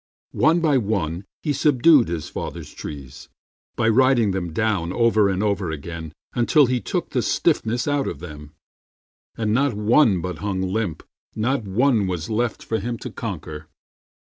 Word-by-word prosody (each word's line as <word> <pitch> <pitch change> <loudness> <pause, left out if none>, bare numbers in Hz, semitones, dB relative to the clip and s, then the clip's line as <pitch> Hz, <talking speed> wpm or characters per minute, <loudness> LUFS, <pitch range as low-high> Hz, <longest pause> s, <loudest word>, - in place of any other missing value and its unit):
One 165 +2 +3
by 150 -5 +3
one 100 -5 -2 0.2
he 150 - 0
subdued 145 -1 +4
his 85 -2 -4
father's - - -7
trees 70 -2 -9 0.5
By 110 - +1
riding 120 -2 +4
them 90 -3 -3
down 100 -3 0
over 110 -1 +3
and 95 +1 -1
over 100 -4 0
again 80 +1 -6 0.2
Until 140 +5 +4
he 125 -1 0
took - - -3
the - - +1
stiffness 115 +4 0
out 145 -1 0
of - - -4
them, 75 -2 -10 0.8
And 110 -2 0
not 135 -1 +2
one 105 -1 +4
but 90 -2 -5
hung 95 0 -2
limp, 95 -3 -2 0.3
not 120 +2 0
one 110 +1 +2
was 90 +1 -4
left 115 +1 -1
For 110 - -1
him 115 +3 -3
to - - -7
conquer. 80 -7 -6
105 Hz, 160 wpm, -22 LUFS, 85-120 Hz, 0.8 s, subdued